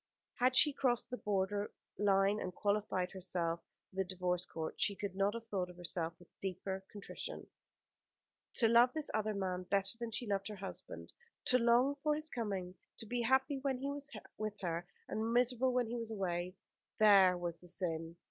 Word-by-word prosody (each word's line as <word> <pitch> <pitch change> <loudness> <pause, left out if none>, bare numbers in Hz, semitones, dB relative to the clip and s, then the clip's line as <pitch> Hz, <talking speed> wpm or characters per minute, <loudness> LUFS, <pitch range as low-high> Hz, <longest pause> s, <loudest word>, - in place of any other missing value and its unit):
Had 255 +1 +2
she 295 - +7
crossed 245 -3 +1
the 250 - -2
border 205 0 0 0.3
line, 200 0 +4
and 180 -2 -4
qualified 200 -3 0
herself 175 -3 -2 0.3
for 190 - -16
the 190 - +3
Divorce 180 -1 -1
Court, 160 -1 -5
she 200 - +3
could 195 -1 -4
not 200 +2 +2
have 230 -1 -6
thought 185 -4 -1
of 180 - -12
herself 170 -1 -2
with 175 - -17
deeper 190 0 -3
contrition. 205 -1 -6 1.1
To 230 - +6
love 235 +2 +6
this 310 -2 0
other 215 -1 0
man 185 -2 -1
better 195 +2 0
than 235 -1 -3
she 235 +2 -3
loved 200 -2 -1
her 210 - -5
husband; 195 0 -8 0.3
to 250 - +5
long 245 +4 +4
for 300 0 +2
his 310 +1 -3
coming; 195 -7 -3 0.2
to - - -8
be 240 +2 -1
happy 265 +3 +2
when 265 -1 0
he 275 +2 -2
was 285 0 -5 0.3
with 215 -1 -3
her, 175 -1 -2 0.2
and 220 +1 -1
miserable 250 +1 +3
when 250 -1 +2
he 235 +2 -3
was 230 -1 -3
away; 180 -3 -2 0.4
there 195 -4 +7
was 175 -1 -3
the 175 - -15
sin. 165 -2 -3
205 Hz, 185 wpm, -36 LUFS, 185-240 Hz, 1.1 s, she